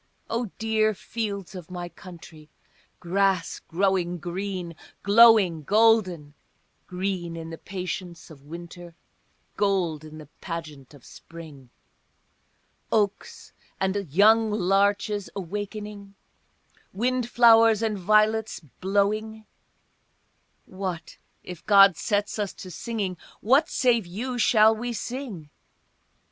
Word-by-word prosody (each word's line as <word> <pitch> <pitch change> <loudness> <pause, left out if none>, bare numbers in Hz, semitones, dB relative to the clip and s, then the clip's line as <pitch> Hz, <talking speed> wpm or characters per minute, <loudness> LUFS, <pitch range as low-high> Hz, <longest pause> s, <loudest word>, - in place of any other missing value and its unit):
O 235 +2 -1
dear 220 -1 +1
fields 200 -3 -5
of 180 -3 -9
my 175 -1 -6
country, 165 -3 -14 0.5
grass 185 0 0
growing 180 -1 -1
green, 175 0 -5 0.3
glowing 205 -6 +6
golden, 195 -5 +2 0.5
Green 180 -2 -3
in 165 0 -7
the 165 - -7
patience 180 -2 -6
of 145 -3 -14
winter, 170 +1 -10 0.6
gold 180 -7 0
in 155 0 -11
the 155 - -10
pageant 150 -3 -9
of 135 - -18
spring, 155 -6 -13 1.2
Oaks 205 -2 -2 0.3
and 190 -4 -2
young 220 +6 +5
larches 200 +1 +1
awaking, 205 +1 -6 0.8
wind 245 +3 -1
flowers 230 -2 +5
and 220 -2 0
violets 215 +3 +2
blowing, 205 - -2 1.2
What, 185 -4 -6 0.2
if 180 -2 -9
God 195 -3 +7
sets 205 +4 -2
us 205 -2 -2
to 185 - -10
singing, 200 -2 -4 0.2
what 275 +9 +3
save 235 -6 +1
you 245 +8 -4
shall 220 -2 +5
we 240 +2 -4
sing? 230 - -6
195 Hz, 105 wpm, -25 LUFS, 175-215 Hz, 1.2 s, God